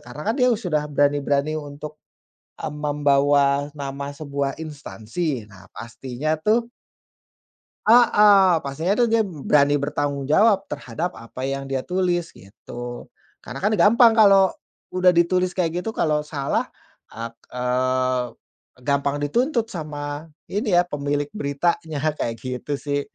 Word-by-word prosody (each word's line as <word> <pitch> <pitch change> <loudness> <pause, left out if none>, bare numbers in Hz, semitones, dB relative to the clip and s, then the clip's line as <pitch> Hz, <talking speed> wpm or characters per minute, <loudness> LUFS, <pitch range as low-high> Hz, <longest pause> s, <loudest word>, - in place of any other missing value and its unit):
karena 150 - -4
kan - - -5
dia 250 - +5
sudah 155 -8 -2
berani-berani 145 0 +1
untuk, 150 +1 -9 0.6
eee, - - -4
membawa 145 -1 +2
nama 140 0 -5
sebuah 140 -1 -4
instansi. 145 -3 -5
Nah, 95 -3 -17
pastinya, 130 +5 -4
tuh 215 +9 +1 1.2
Heeh, 210 -6 +6
pastinya, 155 +8 -1
tuh, 240 +2 +2
dia 225 0 +3
berani 145 -4 +2
bertanggung 145 -1 -2
jawab 200 +4 +3
terhadap 160 +4 -4
apa 115 +2 -10
yang 135 0 -3
dia 135 -1 -2
tulis, 180 -1 -1
gitu, 120 +5 -10 0.3
karena 125 - -8
kan 210 +9 0
gampang 230 +2 +6
kalau 195 -4 +5 0.4
udah 185 0 +4
ditulis 180 +1 +2
kayak 175 -1 0
gitu 225 - -4
kalau 150 -2 +1
salah 150 -2 -2 0.5
ek 115 +1 -5 0.2
eee, 130 0 0 0.6
gampang 140 0 +1
dituntut 235 - 0
sama 150 -1 -6 0.2
ini, 205 -3 0
ya, 175 - +4
pemilik 145 -3 -2
beritanya, 155 -1 -1
kayak 115 -6 -3
gitu, 130 +3 -3
sih. 145 0 -2
145 Hz, 125 wpm, -22 LUFS, 140-180 Hz, 1.2 s, Heeh